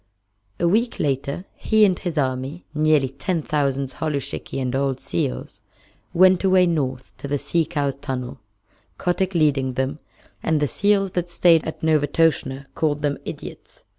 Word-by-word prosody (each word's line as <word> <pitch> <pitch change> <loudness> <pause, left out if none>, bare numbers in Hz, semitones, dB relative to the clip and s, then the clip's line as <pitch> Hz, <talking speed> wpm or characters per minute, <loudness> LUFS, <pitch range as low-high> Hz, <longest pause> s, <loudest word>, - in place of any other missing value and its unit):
A 175 - +2
week 230 +7 +1
later 140 +4 -1
he 220 -1 +3
and 185 -3 +1
his 175 -4 -4
army 135 +4 -2
(nearly 150 -3 +3
ten 165 +4 -2
thousand 140 -3 0
holluschickie 145 -3 -3
and 130 -1 -1
old 135 -1 0
seals) 60 0 -3 0.5
went 185 +1 +5
away 185 -1 +5
north 135 -7 -2
to - - -6
the 145 +1 0
Sea 165 +3 0
Cow's 145 -4 -1
tunnel, 130 -3 -5 0.6
Kotick 180 +1 0
leading 140 -5 +2
them, 130 +4 -2 0.4
and 160 -1 +1
the 145 - +1
seals 195 - +2
that 175 -1 -2
stayed 170 -2 +4
at 160 - -6
Novastoshnah 145 -3 +2
called 150 -2 0
them 145 -1 0
idiots. - - -9
150 Hz, 150 wpm, -22 LUFS, 135-175 Hz, 0.6 s, went